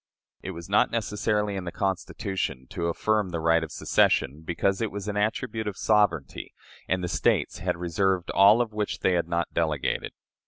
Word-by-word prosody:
It - - -6
was 85 -2 -7
not 100 +2 +3
necessary 105 -1 -1
in 95 -2 -4
the 85 - -4
Constitution 95 -7 -3
to 85 - -2
affirm 105 +3 0
the 85 -1 -3
right 80 0 +3
of 80 - -6
secession, 75 +4 +1
because 90 +5 -1
it 115 - 0
was 100 0 -6
an 105 - -2
attribute 110 +1 -1
of 100 - -4
sovereignty, 100 -10 +1 0.3
and 95 0 0
the - - -1
States - - +1
had - - -1
reserved 90 +1 0
all 105 +5 +6
which 105 -2 -4
they - - +3
had 85 -2 0
not 85 0 -2
delegated. 80 -4 -1
95 Hz, 180 wpm, -26 LUFS, 85-105 Hz, 0.3 s, all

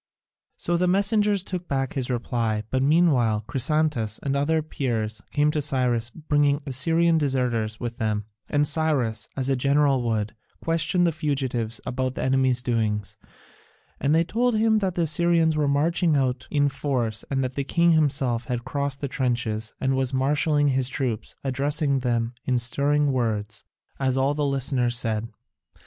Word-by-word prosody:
So 175 0 -1
the 180 +1 +1
messengers 200 +1 +2
took 180 -2 -5
back 135 -2 -2
his 130 -2 -3
reply, 115 -3 -1
but 130 - +1
meanwhile 135 -8 +3
Chrysantas 140 -6 +1
and 140 - -1
certain - - -1
other 155 +3 +1
Peers 110 -8 -3
came 150 0 +2
to 150 -1 -1
Cyrus 125 -5 0
bringing 145 0 +1
Assyrian 165 +5 +2
deserters 125 -6 -1
with 120 -1 -5
them, 105 -2 -1 0.2
and 145 0 +2
Cyrus, 145 -8 0
as 130 -1 -1
a 135 - +2
general 140 0 +2
would, 110 -3 -1 0.3
questioned 165 +2 +1
the 170 - +2
fugitives 135 -7 -2
about 130 0 -2
the - - -3
enemy's 130 -1 +2
doings, 110 -4 -1 0.8
and 145 +3 +2
they 165 - +4
told 235 +6 0
him 220 0 +3
that 190 -4 -2
the 170 - +1
Assyrians 165 0 +2
were 150 -1 +1
marching 160 +3 +2
out 130 -2 -1
in 145 -1 +2
force 125 -6 -2
and 135 -1 0
that 130 0 -3
the 140 - -2
king 170 +4 +2
himself 135 -6 +1
had 120 -2 -4
crossed 140 0 -3
the 140 - -1
trenches 120 -4 -2
and 135 0 0
was 130 0 -1
marshalling 145 +2 +2
his 130 -1 +1
troops, 125 -5 -3
addressing 140 +1 0
them 120 -2 -1
in 125 -1 +1
stirring 140 +4 +2
words, 110 -5 -2 0.4
as 130 -1 +1
all 135 +2 +2
the 150 0 -2
listeners 130 -3 0
said. 115 -1 -2
135 Hz, 165 wpm, -24 LUFS, 120-150 Hz, 0.8 s, they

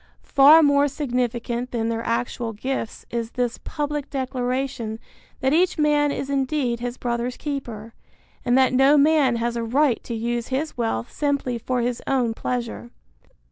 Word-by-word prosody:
Far 295 +4 +8
more 285 0 +4
significant 250 -3 -2
than 230 -2 -1
their 230 0 -2
actual 235 0 -2
gifts 240 +1 -4
is 230 -1 -3
this 245 -1 -1
public 295 -1 -3
declaration 255 -3 -2 0.4
that 265 +1 +2
each 360 +3 +3
man 295 -1 +3
is 275 - -3
indeed 270 -3 0
his 245 +1 -4
brother's 240 +1 -2
keeper, 235 -7 -5 0.5
and 245 -1 +3
that 260 -1 +4
no 270 +3 +5
man 285 -4 +4
has 235 0 -1
a 235 - -2
right 255 +2 +1
to 235 - -4
use 235 +1 -2
his 280 +4 -2
wealth 225 - -2
simply 280 -5 -1
for 250 +1 -1
his 240 0 -2
own 250 -4 +1
pleasure. 240 0 -4
250 Hz, 155 wpm, -23 LUFS, 235-280 Hz, 0.5 s, Far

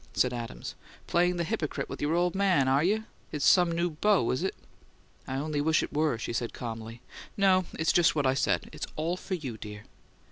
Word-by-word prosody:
said 125 -1 +2
Adams. 115 - -6 0.3
"Playing 175 +1 +2
the 170 - 0
hypocrite 170 -5 -2
with - - -7
your 150 +3 +1
old 175 0 +2
man, 190 -8 +3
are 135 +3 +3
you? 210 +5 +1 0.3
It's 150 -3 -1
some 175 -2 +5
new 170 +1 0
beau, 175 - +2
is 130 - -1
it?" 190 - -1 0.7
"I 130 - -3
only 145 +1 -1
wish 160 +1 +3
it - - -6
were," 150 -4 +1
she 115 - -4
said, 115 0 -2
calmly. 115 0 -7 0.3
"No. 190 -2 +4
It's 160 - +2
just 170 -2 +4
what 145 -2 +1
I 130 - +4
said: 135 - 0
it's - - -5
all 165 +3 -1
for 185 +1 -4
you, 130 -10 -6
dear." 105 0 -8
155 Hz, 210 wpm, -29 LUFS, 130-175 Hz, 0.7 s, some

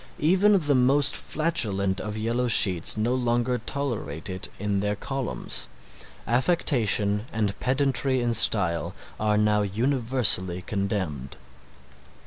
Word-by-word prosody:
Even 190 +6 +3
the 150 -5 +1
most 135 +2 +3
flatulent 100 - -1
of 105 0 -5
yellow 115 +3 -1
sheets 95 -5 +3
no 115 +3 0
longer 120 0 0
tolerate 105 - -4
it 95 0 -6
in 100 0 -2
their 105 +1 -1
columns. 130 - -4 0.6
Affectation 115 - +1
and 105 -2 -1
pedantry 135 0 +1
in 120 -1 0
style 90 -7 +2 0.2
are 105 -1 +1
now 105 0 +2
universally 110 -4 0
condemned. 95 - -4
110 Hz, 115 wpm, -25 LUFS, 100-130 Hz, 0.6 s, Even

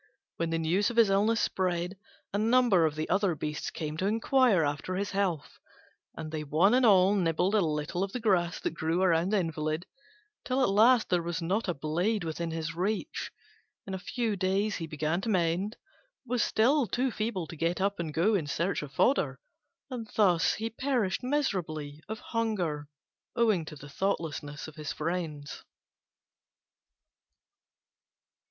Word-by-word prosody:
When 165 0 -1
the 165 - 0
news 170 +5 +1
of 240 - -6
his 225 -4 +6
illness 210 +3 +3
spread, 180 -2 -1 0.4
a 200 - +1
number 225 -6 +4
of 150 - -4
the 155 0 -3
other 195 -4 +1
beasts 150 0 -4
came 155 -1 -5
to 190 - 0
inquire 225 -3 +3
after 145 +5 -2
his 200 +1 -2
health, 190 -7 -2 0.6
and 155 - -6
they 155 -1 -3
one 160 +9 +3
and 255 +1 +4
all 190 -1 +6
nibbled 180 0 +1
a 215 - +4
little 155 +2 -1
of 195 - -3
the 250 - -3
grass 175 -7 +1
that - - -2
grew 165 +3 0
round 175 +1 +2
the 215 - +3
invalid 155 0 -2 0.6
till 265 -1 +1
at - - +3
last 225 +4 +5
there 175 -1 +2
was 170 +1 -3
not 190 +7 -1
a 175 - -1
blade 175 +8 -1
within 165 +1 -3
his 160 0 -3
reach. 195 +6 -2 0.5
In 195 - -6
a 190 - -3
few 225 +2 -2
days 195 +3 0
he 165 - -5
began 155 +3 -1
to 225 - -3
mend, 185 +3 0 0.5
but 240 - -12
was 250 -2 +2
still 255 +4 +3
too 250 +6 0
feeble 215 -5 -2
to 165 - -9
get 165 +3 -1
up 200 0 0
and 165 -2 -3
go 175 +9 +2
in 170 -8 0
search 170 +7 -1
of 145 -2 -8
fodder; 255 - +2 0.5
and 230 -4 -5
thus 180 -6 +3
he 225 +1 -3
perished 240 -5 0
miserably 170 - -2
of 220 - -3
hunger 185 -11 -2 0.5
owing 215 -8 +2
to 155 - -8
the 145 0 -11
thoughtlessness 150 -3 -3
of 155 0 -12
his 150 -1 -4
friends. 155 -3 -4
185 Hz, 175 wpm, -29 LUFS, 160-215 Hz, 0.6 s, his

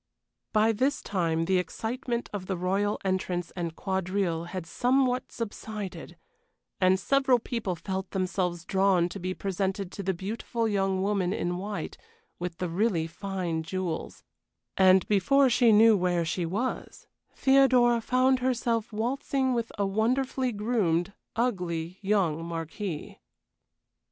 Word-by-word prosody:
By 215 +1 +4
this 265 +6 +1
time 165 -4 -1
the 185 +1 +2
excitement 235 +6 -3
of 190 -3 -5
the 190 - -2
royal 195 +4 0
entrance 185 -2 -1
and 170 -3 -4
quadrille 185 -3 -1
had 180 -1 -5
somewhat 250 +6 +1
subsided, 215 -3 -6 0.6
and 185 0 +4
several 270 +3 +3
people 230 -5 -3
felt 190 +2 -4
themselves 185 -3 -2
drawn 190 -3 +3
to 200 - -7
be 185 +1 -3
presented 195 0 -2
to 200 - -6
the 190 -1 -1
beautiful 225 +4 -2
young 195 -2 0
woman 195 -2 +1
in 175 -3 -2
white 205 +2 -5 0.4
with 175 -1 -4
the 180 - -2
really 175 -1 +1
fine 175 -1 -3
jewels, 170 0 -4 0.5
and 190 0 +5
before 255 +7 +4
she 240 -1 +5
knew 220 +1 +7
where 175 -3 +1
she 170 +1 -1
was, 220 +9 -3 0.3
Theodora 255 -3 +4
found 255 +2 +3
herself 235 -3 0
waltzing 260 +4 0
with 235 -1 -2
a 200 - +1
wonderfully 250 +5 0
groomed, 200 -5 0 0.2
ugly 180 -7 -2
young 190 -6 +1
marquis. 165 +1 -5
195 Hz, 130 wpm, -28 LUFS, 180-230 Hz, 0.6 s, knew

